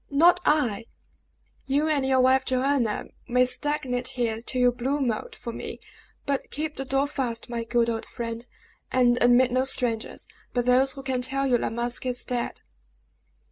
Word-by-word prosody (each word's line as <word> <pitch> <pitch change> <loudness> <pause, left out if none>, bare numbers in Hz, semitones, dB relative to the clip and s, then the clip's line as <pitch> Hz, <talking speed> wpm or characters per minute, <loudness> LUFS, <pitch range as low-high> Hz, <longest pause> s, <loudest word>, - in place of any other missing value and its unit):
"Not 330 +5 +5
I! 245 -9 +2 0.8
You 285 +3 +1
and 295 -3 +1
your 265 -1 +3
wife 260 +1 +4
Joanna 260 -3 0 0.2
may 250 +1 +3
stagnate 255 -2 -1
here 225 -2 -1
till 255 +2 -3
you 250 0 +5
blue 260 +4 -2
mold, 240 -6 -2
for 235 -2 -7
me. - - -6 0.5
But 280 -2 -2
keep 305 +1 -4
the 270 - -4
door 270 +1 +1
fast, 245 -6 -3
my 235 -1 -2
good 235 0 +1
old 225 -1 -3
friend, 230 0 -5 0.5
and 245 -1 +3
admit 245 +1 +5
no 255 +1 +2
strangers, 245 -4 -1 0.3
but 245 -1 0
those 260 +2 +4
who 270 - -9
can 260 -2 -1
tell 275 +2 0
you 250 -3 +3
La - - -1
Masque 240 +2 -2
is 250 -1 -2
dead!" 245 -1 -3
255 Hz, 175 wpm, -26 LUFS, 240-270 Hz, 0.8 s, Not